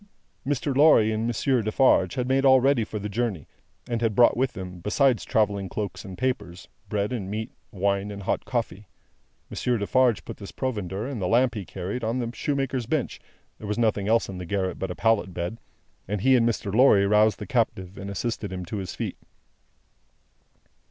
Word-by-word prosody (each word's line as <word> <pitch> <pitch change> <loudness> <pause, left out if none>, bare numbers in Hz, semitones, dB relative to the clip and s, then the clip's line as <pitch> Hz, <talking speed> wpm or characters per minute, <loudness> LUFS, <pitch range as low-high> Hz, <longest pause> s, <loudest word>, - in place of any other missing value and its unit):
Mr. 140 -1 -1
Lorry 135 -7 +6
and 110 +1 -1
Monsieur 120 +2 +1
Defarge 110 -4 +3
had 125 -1 -1
made 135 +1 +2
all 130 -1 +7
ready 135 -2 +3
for 105 - -5
the 105 0 -4
journey, 105 -7 -2 0.4
and 120 -1 -2
had 115 -3 0
brought 120 - +6
with 125 0 0
them, 90 -3 -7
besides 120 - +2
travelling 100 -3 0
cloaks 105 -2 -4
and 95 -2 -9
wrappers, 120 -9 -3 0.2
bread 105 +3 -1
and 100 -6 -4
meat, 110 +2 -4 0.2
wine, 100 +1 0
and 100 -1 -7
hot - - -1
coffee. 110 -5 -3 0.6
Monsieur 125 -1 0
Defarge 120 +2 +2
put - - -7
this 100 -5 -9
provender, 105 -4 -3
and 130 -5 -5
the 90 - 0
lamp 120 +3 +3
he 105 -5 -5
carried, 95 +8 -5
on 115 +3 -1
the 120 -2 -2
shoemaker's 135 -2 -2
bench 150 0 -2 0.4
(there 105 - -7
was 105 +1 -2
nothing 110 -4 +1
else 115 +1 +3
in 95 -2 -7
the 90 - -6
garret 95 -1 -2
but 95 - -3
a - - -4
pallet 110 -5 +1
bed), 90 +6 -4 0.5
and 100 0 -2
he 130 +4 +5
and 120 -1 +3
Mr. 105 -3 -3
Lorry 110 -4 +5
roused 105 +1 +4
the - - -7
captive, 100 -7 -1
and 100 0 -7
assisted 105 +1 -3
him 90 -1 -5
to 105 - -5
his 95 -2 -5
feet. - - -4
110 Hz, 195 wpm, -25 LUFS, 100-125 Hz, 0.6 s, all